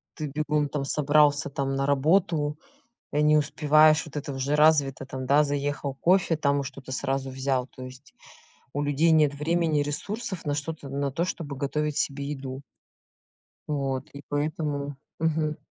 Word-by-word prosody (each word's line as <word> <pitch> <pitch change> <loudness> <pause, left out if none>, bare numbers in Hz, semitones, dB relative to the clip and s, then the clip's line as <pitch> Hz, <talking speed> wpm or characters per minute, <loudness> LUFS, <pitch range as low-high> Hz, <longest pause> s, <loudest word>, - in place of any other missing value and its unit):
ты 155 -2 -4
бегом 150 0 -1
там 140 -1 -3
собрался 145 0 +3
там 135 0 -2
на 135 0 0
работу, 150 +1 +2 0.5
и 150 - +2
не 150 0 +5
успеваешь, 155 +1 +4
вот 150 -1 -8
это 145 -1 -4
уже 135 +3 -1
развито 145 -3 +3
там, 130 0 -6
да, 145 +2 +5
заехал, 145 -1 -2
кофе 175 +2 +3
там 140 -2 +1
и - - -4
что-то 135 -1 -9
сразу 135 0 -2
взял, 130 -1 -1
то 130 - -11
есть 130 +2 -13 0.6
у 145 - -1
людей 145 +3 +2
нет 150 -2 +4
времени, 160 0 +1
ресурсов 190 +6 -3
на 145 - 0
что-то, 145 -1 -5
на 140 0 -2
то, 170 +5 0
чтобы 150 -6 -5
готовить 150 +2 -2
себе 140 0 -1
еду. 135 -1 -6 1.1
Вот, 140 -1 -2
и 140 0 -10
поэтому. 145 -1 -2 0.2
Мгм. 155 -1 0
145 Hz, 160 wpm, -26 LUFS, 140-155 Hz, 1.1 s, не